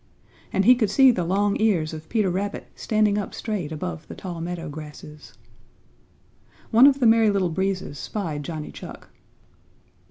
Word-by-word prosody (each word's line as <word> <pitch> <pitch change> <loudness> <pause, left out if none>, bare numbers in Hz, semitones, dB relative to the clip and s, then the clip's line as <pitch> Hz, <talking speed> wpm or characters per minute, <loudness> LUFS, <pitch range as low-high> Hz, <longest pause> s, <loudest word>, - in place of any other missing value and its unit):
And 195 - +1
he 250 - +9
could 230 -5 0
see 265 +5 +6
the 185 -7 -1
long 200 +4 +1
ears 175 -8 +1
of 155 0 -9
Peter 215 -5 +1
Rabbit 200 +3 -3
standing 215 -1 +1
up 205 - -5
straight 200 -9 -4
above 85 - -5
the - - -9
tall 175 -3 -7
meadow 170 0 -5
grasses. 150 0 -10 1.4
One 240 +4 +8
of 280 -1 +3
the 250 - +2
Merry 225 -1 +5
Little 195 -3 +1
Breezes 185 -4 -2
spied 165 -9 -4
Johnny 155 0 -6
Chuck. - - -11
190 Hz, 160 wpm, -24 LUFS, 160-215 Hz, 1.4 s, he